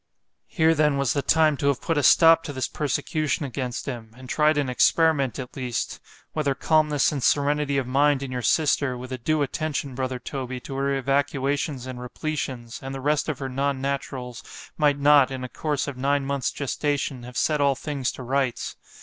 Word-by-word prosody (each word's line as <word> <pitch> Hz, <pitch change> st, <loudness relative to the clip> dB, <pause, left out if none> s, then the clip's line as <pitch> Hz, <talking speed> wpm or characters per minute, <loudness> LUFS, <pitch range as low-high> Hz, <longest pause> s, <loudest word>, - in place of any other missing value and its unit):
—— -, -, -53 dB
Here 160 Hz, -2 st, +3 dB
then 150 Hz, -2 st, +2 dB
was 140 Hz, -3 st, +1 dB
the 140 Hz, -, 0 dB
time 155 Hz, 0 st, +3 dB
to 140 Hz, -, -1 dB
have 140 Hz, -2 st, +2 dB
put 165 Hz, -, -1 dB
a 145 Hz, -, +2 dB
stop 165 Hz, +3 st, +6 dB
to 145 Hz, -, -5 dB
this 130 Hz, -2 st, -2 dB
persecution 150 Hz, +2 st, -1 dB
against 125 Hz, -2 st, -4 dB
him;——and 120 Hz, 0 st, -8 dB
tried 155 Hz, +3 st, +2 dB
an 145 Hz, -2 st, +1 dB
experiment 140 Hz, +1 st, +3 dB
at 130 Hz, -3 st, -7 dB
least——whether 135 Hz, +3 st, -4 dB
calmness 150 Hz, -2 st, +2 dB
and 145 Hz, -3 st, -3 dB
serenity 145 Hz, +1 st, +2 dB
of 135 Hz, -, 0 dB
mind 140 Hz, +2 st, +2 dB
in 135 Hz, -, -5 dB
your 125 Hz, -1 st, -3 dB
sister, 140 Hz, 0 st, +2 dB
with 125 Hz, +1 st, -8 dB
a 130 Hz, -, -4 dB
due 155 Hz, +5 st, +1 dB
attention, 145 Hz, -1 st, -3 dB
brother 130 Hz, 0 st, -2 dB
Toby, 130 Hz, 0 st, -5 dB
to 135 Hz, -, -8 dB
her 140 Hz, +1 st, 0 dB
evacuations 140 Hz, 0 st, -1 dB
and 130 Hz, -1 st, -7 dB
repletions——and 130 Hz, -1 st, -5 dB
the -, -, -5 dB
rest 150 Hz, +3 st, 0 dB
of 150 Hz, -, -2 dB
her 135 Hz, -, -4 dB
non 135 Hz, +1 st, -1 dB
naturals, 130 Hz, -3 st, -4 dB, 0.3 s
might 145 Hz, -2 st, +2 dB
not, 145 Hz, -1 st, +5 dB
in 130 Hz, -1 st, -5 dB
a -, -, -3 dB
course 150 Hz, 0 st, -2 dB
of 140 Hz, -3 st, -5 dB
nine 140 Hz, +1 st, +1 dB
months 140 Hz, -1 st, -1 dB
gestation, 140 Hz, -1 st, -2 dB
have 125 Hz, +1 st, -9 dB
set 150 Hz, -2 st, +1 dB
all 140 Hz, -1 st, +3 dB
things 140 Hz, -2 st, -3 dB
to 130 Hz, -, -8 dB
rights. 130 Hz, -1 st, -1 dB
140 Hz, 190 wpm, -25 LUFS, 130-150 Hz, 0.3 s, stop